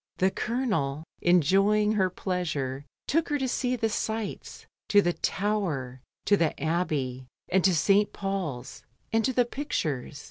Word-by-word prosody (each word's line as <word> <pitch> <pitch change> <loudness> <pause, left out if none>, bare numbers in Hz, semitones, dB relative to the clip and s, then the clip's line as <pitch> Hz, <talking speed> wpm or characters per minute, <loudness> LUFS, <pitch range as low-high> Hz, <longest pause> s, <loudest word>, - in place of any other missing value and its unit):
The 190 +1 +3
Colonel, 200 - -1 0.2
enjoying 195 +5 +4
her 190 -4 +2
pleasure, 150 -8 -3 0.2
took 325 +3 +1
her 295 - +1
to 265 - -1
se^. 250 -1 -1
the 225 - +2
sights, 220 0 -4 0.2
to 205 - +6
the 175 -3 +2
Tower, 170 -14 -2 0.2
to 205 - +5
the 165 -5 0
Abbey, 140 -5 -1 0.2
and 185 0 +3
to 185 -2 +4
St 200 +5 +3
Paul's, 190 -12 -4 0.3
and 225 0 +3
to 260 - +2
the 245 -1 +3
pictures. 155 - -3
190 Hz, 145 wpm, -27 LUFS, 150-215 Hz, 0.3 s, to